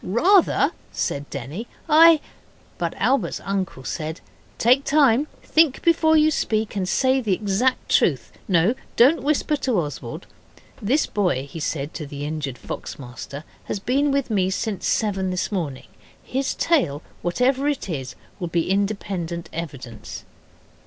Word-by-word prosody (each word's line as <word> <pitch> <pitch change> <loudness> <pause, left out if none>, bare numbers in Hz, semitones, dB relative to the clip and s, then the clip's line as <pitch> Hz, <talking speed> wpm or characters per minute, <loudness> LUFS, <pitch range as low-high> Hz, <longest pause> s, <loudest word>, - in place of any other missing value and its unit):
'Rather,' 345 - +4 0.2
said 140 +1 -3
Denny; 145 - -6 0.2
'I 320 0 +7 0.3
' - - -31
But 170 -2 -2
Albert's 260 +6 +1
uncle 190 -9 -3
said, 160 +3 -4 0.4
'Take 255 +4 +4
time. 280 -2 +4 0.2
Think 315 -4 +3
before 320 -1 +4
you 310 0 +4
speak 220 -7 -1
and 185 -2 -1
say 260 0 +2
the 205 -6 +1
exact 210 +6 0
truth. 130 -8 +2 0.2
No, 180 +4 +3 0.2
don't 270 +8 +5
whisper 300 +1 +1
to 255 -5 0
Oswald. 145 -6 -5 0.6
This 260 +9 +2
boy,' 175 -10 0
he 165 +3 -8
said 145 -1 -3
to 150 - -6
the 145 0 -6
injured 145 -4 -4
fox - - -7
master, 140 +2 -8 0.2
'has - - -3
been 270 +8 +1
with 275 -3 0
me 190 -3 +2
since 205 +1 -2
seven 195 -4 0
this 185 +3 -2
morning. 155 -10 -4 0.3
His 265 +1 -2
tale, 205 - +1 0.2
whatever 255 +10 +1
it 290 -7 -1
is, 135 -7 -5 0.2
will 175 - -3
be 170 +1 0
independent 195 -4 -2
evidence. 130 -9 -7
195 Hz, 145 wpm, -23 LUFS, 160-265 Hz, 0.6 s, I